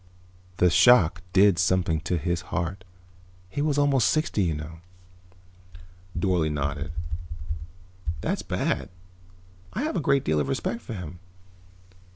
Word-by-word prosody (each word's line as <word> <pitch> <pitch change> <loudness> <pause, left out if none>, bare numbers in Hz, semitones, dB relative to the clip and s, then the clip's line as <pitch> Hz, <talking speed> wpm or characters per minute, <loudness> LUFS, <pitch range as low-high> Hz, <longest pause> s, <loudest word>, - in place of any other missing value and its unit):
The 90 -1 +4
shock 90 -2 +6
did 95 -2 +5
something 90 -3 +2
to 90 - +1
his 85 +1 -1
heart. 90 +1 -2 0.7
He 145 - -2
was 145 -1 +1
almost 140 -4 +4
sixty, 155 -9 +1
you 85 -5 +1
know." 80 +2 -7 1.4
Dorle 85 -3 +1
nodded. 70 +1 -2 1.3
"That's - - -1
bad. - - -1 0.8
I 250 - -2
have 305 - -1
a - - +1
great 140 -1 +2
deal 75 0 +2
of 70 - 0
respect 115 +11 -2
for 115 - -7
him. 90 -2 -7
90 Hz, 130 wpm, -26 LUFS, 80-115 Hz, 1.4 s, shock